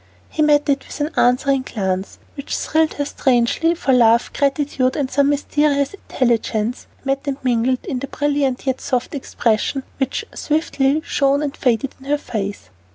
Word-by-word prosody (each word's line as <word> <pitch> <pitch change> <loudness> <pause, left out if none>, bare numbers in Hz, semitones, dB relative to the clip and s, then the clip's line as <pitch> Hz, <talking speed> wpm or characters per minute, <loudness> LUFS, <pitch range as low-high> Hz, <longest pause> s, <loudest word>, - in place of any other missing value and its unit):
He - - -2
met 295 -1 +4
it 280 -1 0
with - - -8
an 295 +2 -1
answering 265 +2 +3
glance, 190 -6 -3 0.2
which 280 -1 -4
thrilled 320 0 +1
her 285 - -1
strangely, 265 +6 +1
for 275 -5 +1
love, 235 -1 +4
gratitude, 275 -2 0
and 275 -3 -2
some 280 +1 +3
mysterious 290 0 +1
intelligence 235 - -1 0.2
met 275 +1 -1
and 275 -1 -1
mingled 250 0 +1
in 275 -9 -3
the 275 - -5
brilliant 285 -3 -1
yet 260 -1 -1
soft 255 +2 -2
expression 260 -1 -1 0.2
which 270 -1 -1
swiftly 300 -1 0
shone 280 +1 +2
and 285 -2 -3
faded 250 +1 0
in 270 - -14
her 295 +1 +2
face. 205 - -5
275 Hz, 160 wpm, -20 LUFS, 250-290 Hz, 0.2 s, met